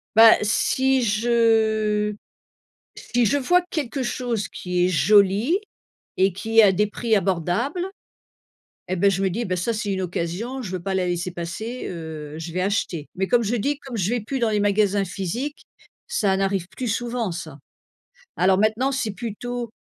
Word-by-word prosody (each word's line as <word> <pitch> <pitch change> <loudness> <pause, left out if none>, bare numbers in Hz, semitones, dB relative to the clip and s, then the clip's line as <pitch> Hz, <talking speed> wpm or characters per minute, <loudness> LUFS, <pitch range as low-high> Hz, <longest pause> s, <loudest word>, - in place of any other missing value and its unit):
Bah, 225 0 +9
si 260 +5 +2
je 220 -2 +2 0.8
si 245 -1 0
je 250 - +2
vois 355 +7 +3
quelque 280 -3 -2
chose 240 -3 -2
qui 180 -1 -1
est - - +1
joli 205 - +4 0.6
et 190 +1 +3
qui 220 +5 -2
est - - +8
a 200 -3 +6
des 210 +3 +2
prix 225 +1 0
abordables, 200 - 0 1.0
et 185 - -1
beh, 200 +3 +4
je 195 0 -1
me 190 - +2
dis: 230 +7 -2
«Bah, 185 -3 -1
ça 185 +7 -1
c'est 210 -2 -2
une 190 -1 -2
occasion! 185 +9 -3
Je 195 -6 -6
veux 185 -2 -4
pas 195 +1 -2
la 185 -1 +1
laisser 175 0 -2
passer, 180 +9 -5
heu, 160 -3 -7
je 165 +1 -6
vais 180 - -1
acheter». 185 -6 -1
Mais 190 +1 0
comme 240 +4 +3
je 230 +2 0
dis, 280 +6 -1
comme 265 -3 -7
je 195 -1 0
vais 245 0 0
plus 255 +6 -4
dans 235 -3 +1
les 210 -1 +1
magasins 205 -1 +2
physiques, 200 - -4 0.5
ça 205 - +1
n'arrive 195 -2 -1
plus 255 - -3
souvent 235 -2 -2
ça. 160 -4 -7 0.8
Alors, 185 +1 +4
maintenant, 220 +6 +2
c'est 255 -5 -1
plutôt 235 +3 -5
210 Hz, 180 wpm, -23 LUFS, 185-240 Hz, 1.0 s, Bah